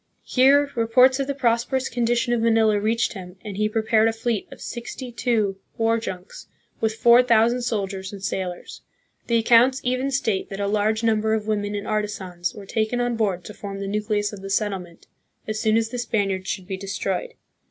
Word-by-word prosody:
Here, 280 +2 +4
reports 250 +3 +4
of 275 - -1
the 280 - -2
prosperous 255 +1 +1
condition 240 +1 0
of 235 - +1
Manila 225 -2 +3
reached 225 +2 0
him, 180 -3 -9
and 205 -2 -5
he 215 +1 0
prepared 220 0 +2
a - - +2
fleet 225 -2 -2
of - - -11
sixty 245 +1 -7
two 220 -5 0 0.2
war 225 0 +2
junks, 185 -5 -8 0.3
with 220 -1 0
four 235 +2 +6
thousand 235 0 +3
soldiers 195 -5 -3
and 200 -2 -9
sailors. 185 -2 -4 0.5
The 235 - +1
ac 230 - +3
counts 245 +3 +5
even 255 +2 0
state 230 -8 -1
that 195 - -6
a 200 - 0
large 215 +2 +1
number 220 -1 +2
of 215 -1 -3
women 205 -1 -1
and 205 0 -4
artisans 190 -5 -3
were 205 - -9
taken 220 +4 -1
on 245 -1 0
board 195 -6 -1
to 210 - -8
form 200 -1 -7
the 200 - -4
nucleus 210 +1 -1
of 200 - -8
the 195 - -7
settlement, 195 -4 -2 0.4
as 215 0 -2
soon 220 0 +3
as 225 0 0
the 245 +1 -5
Spaniards 195 -5 -1
should 185 - -3
be 190 0 -4
destroyed. 200 - -3
220 Hz, 195 wpm, -23 LUFS, 200-235 Hz, 0.5 s, four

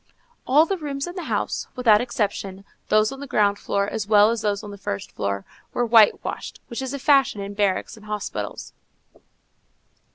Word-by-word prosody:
All 295 +5 +6
the 385 +1 -2
rooms 280 -3 -3
in 350 - -7
the 360 - -5
house, - - -2
without 225 -4 +5
exception, 200 -5 -3 0.2
those 215 0 +3
on 270 - -8
the 280 - -7
ground 205 -4 +2
floor 200 0 -1
as 210 0 -4
well 210 0 +6
as 230 -1 -2
those 205 -1 -1
on 205 - -8
the 200 - -9
first 100 - -5
floor, 100 0 -3 0.3
were 245 - +1
white 225 -2 +5
washed, - - -6
which 235 +1 -4
is 265 +1 -4
a - - -3
fashion 275 -5 +3
in 200 0 -5
barracks 200 -2 0
and 215 0 -14
hospitals. 210 -1 -5
215 Hz, 190 wpm, -23 LUFS, 200-265 Hz, 0.3 s, All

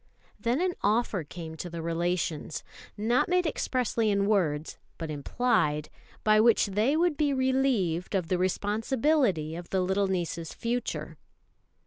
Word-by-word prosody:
Then 240 +4 0
an 365 -1 +1
offer 210 -3 +1
came 160 +1 -8
to 175 - -5
the 165 -1 -6
relations 170 -2 -2 0.3
not 235 +8 +2
made 360 0 +2
expressly 250 -7 0
in 200 -1 +2
words, 165 -8 0 0.2
but 165 -2 -5
implied 150 - 0 0.3
by 215 0 +5
which 230 +1 +5
they 215 +9 +1
would 340 -3 +2
be 290 -2 +2
relieved 260 -10 +1
of 180 -4 0
the 180 +1 0
responsibility 205 - +1
of 175 0 -8
the 190 - +1
little 190 +2 +1
niece's 170 -3 -3
future. 240 +1 -3
200 Hz, 140 wpm, -28 LUFS, 170-245 Hz, 0.3 s, by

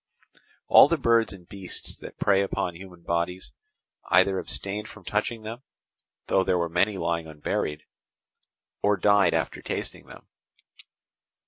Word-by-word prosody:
All - - +9
the 170 - +1
birds 115 -4 +3
and 90 -3 -12
beasts 95 -2 -6
that - - -11
prey 100 -1 +3
upon 95 -2 -2
human 90 -1 -12
bodies, 85 -2 -2 0.6
either 95 +1 +4
abstained 105 +2 -4
from 105 -4 -14
touching 110 +2 -2
them 115 +3 -7 0.6
(though 95 - +2
there 90 - +1
were 85 -1 -1
many 95 +4 +1
lying 85 -2 -1
unburied), 75 0 -3 1.0
or 100 0 +3
died 100 +1 +4
after - - -2
tasting - - -5
them. - - -13
95 Hz, 135 wpm, -26 LUFS, 85-105 Hz, 1.0 s, All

